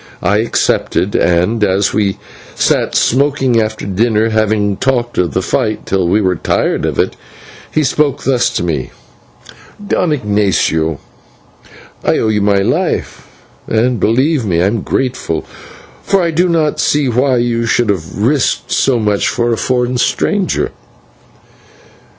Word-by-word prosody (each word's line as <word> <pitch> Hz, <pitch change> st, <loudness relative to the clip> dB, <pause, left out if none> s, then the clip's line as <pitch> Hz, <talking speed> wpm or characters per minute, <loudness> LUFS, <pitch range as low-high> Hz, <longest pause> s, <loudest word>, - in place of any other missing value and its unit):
I 100 Hz, +3 st, +2 dB
accepted, 105 Hz, -3 st, 0 dB
and 90 Hz, +6 st, +1 dB
as 95 Hz, 0 st, +1 dB
we 100 Hz, -1 st, 0 dB, 0.4 s
sat -, -, +1 dB
smoking 135 Hz, -2 st, +2 dB
after 110 Hz, 0 st, -3 dB
dinner, 110 Hz, +3 st, +1 dB
having 105 Hz, -2 st, 0 dB
talked 120 Hz, -2 st, -1 dB
of 90 Hz, -2 st, 0 dB
the 95 Hz, -, 0 dB
fight 110 Hz, -2 st, -1 dB
till 95 Hz, -2 st, 0 dB
we 100 Hz, +5 st, +2 dB
were 95 Hz, -2 st, +1 dB
tired -, -, 0 dB
of -, -, -2 dB
it, -, -, 0 dB, 0.6 s
he 155 Hz, -, +1 dB
spoke 145 Hz, 0 st, 0 dB
thus 130 Hz, -2 st, +2 dB
to -, -, -1 dB
me: 80 Hz, -7 st, -2 dB, 1.0 s
"Don 175 Hz, -, +1 dB
Ignatio, 100 Hz, -, 0 dB, 1.1 s
I -, -, +2 dB
owe 110 Hz, -, 0 dB
you 105 Hz, -1 st, +1 dB
my 100 Hz, -1 st, +2 dB
life, -, -, -2 dB, 0.4 s
and, 115 Hz, +1 st, +1 dB
believe 130 Hz, +5 st, +1 dB
me, 90 Hz, -6 st, 0 dB
I 90 Hz, -, +2 dB
am 105 Hz, +2 st, 0 dB
grateful, 120 Hz, -12 st, -2 dB, 0.6 s
for 195 Hz, -2 st, +1 dB
I 170 Hz, -, 0 dB
do 175 Hz, +3 st, +1 dB
not 160 Hz, -3 st, 0 dB
see 145 Hz, -2 st, +1 dB
why 130 Hz, +2 st, +1 dB
you 120 Hz, -1 st, 0 dB
should 120 Hz, -1 st, +1 dB
have 90 Hz, -4 st, -3 dB
risked 130 Hz, +6 st, 0 dB
so 135 Hz, -3 st, +2 dB
much 105 Hz, -3 st, 0 dB
for 120 Hz, -1 st, 0 dB
a -, -, +1 dB
foreign 125 Hz, 0 st, 0 dB
stranger." 200 Hz, -, 0 dB
110 Hz, 145 wpm, -14 LUFS, 100-130 Hz, 1.1 s, I